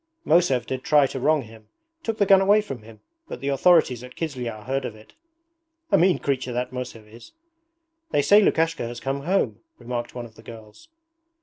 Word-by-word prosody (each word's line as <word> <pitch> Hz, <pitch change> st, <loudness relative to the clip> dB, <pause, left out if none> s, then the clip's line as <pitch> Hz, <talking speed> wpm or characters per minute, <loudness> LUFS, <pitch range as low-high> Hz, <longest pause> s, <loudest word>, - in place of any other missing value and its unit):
'Mosev 150 Hz, -8 st, +3 dB
did 130 Hz, -1 st, -5 dB
try 145 Hz, -2 st, +4 dB
to 135 Hz, -, -4 dB
wrong 150 Hz, +2 st, +2 dB
him. 110 Hz, -1 st, -15 dB, 0.3 s
Took 225 Hz, -6 st, -3 dB
the 200 Hz, -, +3 dB
gun 195 Hz, 0 st, +6 dB
away 200 Hz, +2 st, +5 dB
from 135 Hz, -, -7 dB
him, 110 Hz, 0 st, -15 dB, 0.3 s
but -, -, -7 dB
the 140 Hz, -, -3 dB
authorities 140 Hz, -4 st, +3 dB
at 125 Hz, 0 st, -12 dB
Kizlyar 125 Hz, -9 st, -5 dB
heard 135 Hz, +3 st, -2 dB
of 115 Hz, -, -5 dB
it.' 110 Hz, 0 st, -18 dB, 0.8 s
'A -, -, +5 dB
mean 180 Hz, +2 st, +4 dB
creature 130 Hz, -3 st, -2 dB
that 125 Hz, +1 st, -3 dB
Mosev 125 Hz, -4 st, -7 dB
is!' 115 Hz, +2 st, -15 dB, 0.8 s
'They 145 Hz, -, +2 dB
say 205 Hz, +6 st, +6 dB
Lukashka 165 Hz, -, +1 dB
has 120 Hz, 0 st, -7 dB
come 135 Hz, +3 st, -3 dB
home,' 190 Hz, +3 st, 0 dB, 0.2 s
remarked 120 Hz, 0 st, -5 dB
one 120 Hz, -1 st, -5 dB
of 115 Hz, -, -14 dB
the 115 Hz, -, -16 dB
girls. 110 Hz, -, -13 dB
130 Hz, 195 wpm, -24 LUFS, 120-165 Hz, 0.8 s, gun